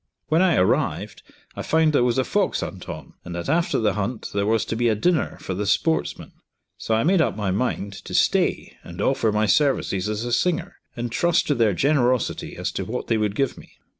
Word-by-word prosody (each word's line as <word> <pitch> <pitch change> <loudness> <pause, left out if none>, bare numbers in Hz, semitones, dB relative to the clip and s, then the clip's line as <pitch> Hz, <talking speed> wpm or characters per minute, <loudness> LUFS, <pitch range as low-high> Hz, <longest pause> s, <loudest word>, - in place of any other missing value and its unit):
When 160 +3 +3
I 185 -2 +4
arrived, 90 - 0 0.3
I - - -4
found 160 -1 +2
there 135 - +4
was 120 0 +1
a 130 - +3
fox 200 +6 0
hunt 95 -2 -7
on, - - -8
and 85 - -7
that 85 - -5
after 165 +4 +1
the 105 -3 +1
hunt 110 +3 -3
there 100 0 0
was 110 0 +2
to - - -3
be 120 +1 +2
a 110 - +2
dinner 165 - 0
for 95 - -5
the 100 +3 -3
sportsmen, 160 +10 0 0.4
so 110 - -1
I 110 - +1
made 180 +3 +3
up - - 0
my 100 -3 -1
mind 100 -1 -2
to - - -5
stay - - +1
and - - -10
offer 110 - +1
my 105 +1 +1
services 105 -6 +1
as 110 +2 -3
a 120 - -2
singer, 180 +5 0 0.2
and 120 -1 -4
trust 170 +7 +2
to - - +4
their 115 -6 +2
generosity 130 - +1
as - - -2
to - - -3
what - - -5
they 115 - +2
would 105 -1 -1
give 135 +1 -1
me. - - -16
120 Hz, 225 wpm, -23 LUFS, 105-155 Hz, 0.4 s, I